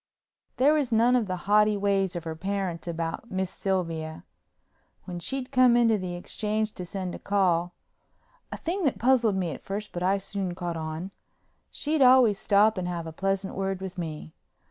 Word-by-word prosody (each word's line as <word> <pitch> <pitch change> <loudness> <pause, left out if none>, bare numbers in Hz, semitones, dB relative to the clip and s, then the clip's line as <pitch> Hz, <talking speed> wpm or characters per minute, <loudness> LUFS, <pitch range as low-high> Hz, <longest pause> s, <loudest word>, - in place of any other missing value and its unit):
There 280 +4 +5
was 290 -5 0
none 235 +3 +4
of 235 -4 +1
the 185 - -2
haughty 210 +1 +4
ways 195 -2 +1
of 170 - -4
her 160 -1 -5
parents 190 -1 -3
about 165 +6 -4
Miss 190 -1 -2
Sylvia. 165 -5 -3 0.8
When 175 -2 -6
she'd 260 +7 -4
come 255 -2 +5
into 230 -2 +4
the 180 -1 -4
exchange 215 +4 -2
to 180 - -6
send 185 0 -5
a - - -7
call 180 -3 +1 0.8
(a - - -4
thing 360 +4 -3
that 275 - +1
puzzled 240 -4 +3
me 175 -6 -2
first 205 +2 -5
but 175 - -5
I 190 +2 +2
soon 195 -2 -3
caught 175 -2 -4
on) 160 +3 -5 0.6
she'd 300 0 -1
always 250 -6 +6
stop 210 0 +3
and 180 - -3
have 170 -2 -3
a 160 - -7
pleasant 195 +2 -1
word 195 -1 -2
with 190 -1 -6
me. 155 -2 -6
195 Hz, 180 wpm, -27 LUFS, 175-220 Hz, 0.8 s, always